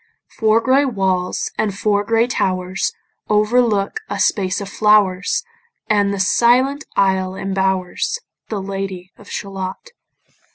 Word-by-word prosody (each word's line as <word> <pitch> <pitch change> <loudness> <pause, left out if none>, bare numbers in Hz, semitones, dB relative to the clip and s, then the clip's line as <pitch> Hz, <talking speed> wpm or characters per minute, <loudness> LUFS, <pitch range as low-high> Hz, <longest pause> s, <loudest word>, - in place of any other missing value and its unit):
Four 220 0 +4
gray 265 +3 +3
walls, 190 -7 -1
and 205 -3 -1
four 205 -1 +1
gray 225 +2 +2
towers, 185 -5 -1 0.4
Overlook 215 - +2
a - - -3
space 190 -2 +1
of 200 - -6
flowers, 200 -2 +2 0.5
And 205 -1 +3
the 200 - -3
silent 250 +8 +3
isle 190 -1 +2
imbowers 190 - -1 0.3
The 205 -3 -3
Lady 195 -2 -5
of 205 - -15
Shalott. 195 - -6
200 Hz, 120 wpm, -19 LUFS, 190-220 Hz, 0.5 s, Four